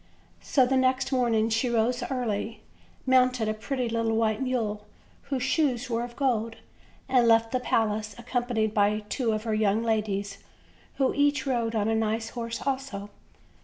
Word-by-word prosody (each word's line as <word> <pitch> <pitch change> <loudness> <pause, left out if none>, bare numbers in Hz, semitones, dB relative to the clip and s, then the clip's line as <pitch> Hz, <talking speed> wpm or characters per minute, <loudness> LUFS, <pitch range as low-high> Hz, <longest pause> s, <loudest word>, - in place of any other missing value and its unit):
So 260 -3 +3
the 265 +1 +1
next 260 +1 +1
morning 230 -4 +2
she 225 +3 +1
rose 235 +1 +1
early, 230 -4 -3 0.4
mounted 255 -3 +3
a 215 - 0
pretty 250 +3 -3
little 230 -1 0
white 220 0 +1
mule, 220 -5 -2 0.4
whose 265 -3 -1
shoes 265 -4 0
were 230 0 0
of 240 0 -8
gold, 230 -5 0 0.5
and 255 -3 +3
left 225 0 +4
the 255 - +1
palace 215 -3 0
accompanied 240 -3 -1
by 210 0 +2
two 240 -2 0
of 215 0 -2
her 225 -1 -1
young 215 +1 +2
ladies, 205 -3 -1 0.6
who 265 -2 +1
each 285 -1 +2
rode 235 -4 -1
on 210 -1 +1
a 225 - +1
nice 225 0 -1
horse 230 0 -5
also. 260 -7 -3
230 Hz, 165 wpm, -27 LUFS, 220-255 Hz, 0.6 s, left